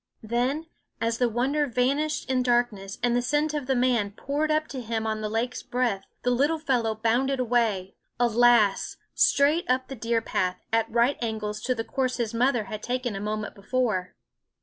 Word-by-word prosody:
Then, 250 +8 0 0.3
as 230 +1 -1
the 245 -1 +3
wonder 275 +6 +1
vanished 275 +5 0
in 260 -1 +1
darkness 240 -6 0
and 240 -1 +2
the 245 - +2
scent 295 +4 0
of 290 -4 -3
the 265 - +2
man 245 -4 +2
poured 285 +9 -2
up 310 0 +1
to 260 - -5
him 225 -1 -2
on 215 0 -2
the 215 - -2
lake's 230 +3 -2
breath, 240 -6 -1 0.2
the 245 - +2
little 285 +6 +2
fellow 245 -8 0
bounded 245 +5 +1
away 225 -6 +1 0.3
alas! 235 -3 +3 0.2
straight 295 +4 +3
up 255 0 +1
the 270 - -5
deer 230 0 0
path, 185 -4 -1 0.2
at 225 0 +2
right 235 +4 +2
angles 215 -2 -3
to 255 +2 0
the 225 - -2
course 255 0 -1
his 235 -2 -2
mother 240 0 +2
had 210 +1 -7
taken 245 -2 -2
a - - -3
moment 210 +1 -3
before. 200 -3 -1
240 Hz, 185 wpm, -26 LUFS, 220-260 Hz, 0.3 s, the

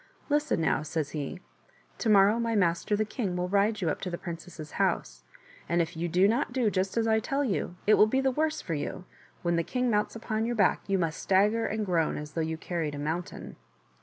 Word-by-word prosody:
" - - -31
Listen 295 - +2
now," 150 -3 +2
says 155 -1 -3
he; 155 +4 -5 0.3
" - - -33
to 230 - 0
morrow 205 +2 +5
my 230 -1 0
master, 180 +1 +2
the 215 +1 0
king, 210 -4 -3
will 180 0 -1
ride 205 +3 +2
you 170 - +1
up - - -5
to 185 - -3
the 175 - -4
princess's 165 -3 -8
house, - - -1 0.5
and 170 - +2
if 170 +1 -1
you 170 +2 -2
do 180 +4 +4
not 230 +3 +1
do 240 -4 +1
just 190 +3 -1
as 225 - +2
I 220 -1 +3
tell 275 +6 -1
you, 195 -7 -2
it 215 - +5
will 215 - +6
be 265 +5 +1
the 270 0 +2
worse 310 +3 0
for 165 - -3
you; 150 +4 -4 0.4
when 170 -1 +1
the 170 - +1
king 250 +5 0
mounts 210 +1 0
upon 225 0 -2
your 240 - -1
back 205 -4 +3
you 195 -1 +2
must 165 -3 -2
stagger 210 +4 +3
and 215 0 -2
groan, 170 -4 +1
as 150 0 -7
though 165 - -2
you 160 0 -2
carried 160 -3 -3
a - - -6
mountain." 160 +4 -4
190 Hz, 240 wpm, -28 LUFS, 165-220 Hz, 0.5 s, will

